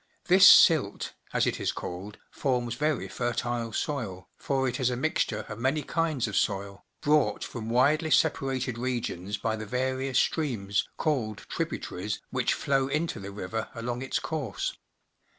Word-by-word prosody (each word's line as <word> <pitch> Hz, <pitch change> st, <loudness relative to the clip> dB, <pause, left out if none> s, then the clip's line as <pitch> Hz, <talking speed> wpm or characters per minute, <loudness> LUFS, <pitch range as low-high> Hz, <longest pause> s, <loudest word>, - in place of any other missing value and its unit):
This 185 Hz, +1 st, +8 dB
silt, 150 Hz, -, +5 dB, 0.2 s
as -, -, +2 dB
it -, -, -1 dB
is -, -, 0 dB
called, 95 Hz, +4 st, -7 dB
forms 125 Hz, -3 st, -1 dB
very 150 Hz, +3 st, 0 dB
fertile 120 Hz, -1 st, -2 dB
soil, 105 Hz, -, -3 dB
for 135 Hz, -1 st, 0 dB
it 125 Hz, 0 st, -2 dB
is 130 Hz, -2 st, +2 dB
a 125 Hz, -, -1 dB
mixture 120 Hz, -6 st, -1 dB
of 105 Hz, 0 st, -7 dB
many 135 Hz, +5 st, +1 dB
kinds 155 Hz, -5 st, 0 dB
of 105 Hz, -, -4 dB
soil, 100 Hz, -1 st, -1 dB, 0.2 s
brought 145 Hz, -8 st, +2 dB
from 115 Hz, -2 st, -6 dB
widely 145 Hz, +7 st, +3 dB
separated 135 Hz, -6 st, +1 dB
regions 115 Hz, -6 st, -2 dB
by 110 Hz, +1 st, -1 dB
the 110 Hz, -1 st, -6 dB
various 130 Hz, +2 st, -1 dB
streams, 110 Hz, -13 st, 0 dB
called 120 Hz, -10 st, -1 dB
tributaries, 105 Hz, +3 st, -3 dB
which 130 Hz, -2 st, +1 dB
flow 135 Hz, -1 st, +1 dB
into 155 Hz, +4 st, -1 dB
the 100 Hz, 0 st, -7 dB
river 105 Hz, +3 st, -4 dB
along 120 Hz, +1 st, -3 dB
its 130 Hz, -, -1 dB
course. 145 Hz, -10 st, -3 dB
125 Hz, 150 wpm, -28 LUFS, 110-140 Hz, 0.2 s, This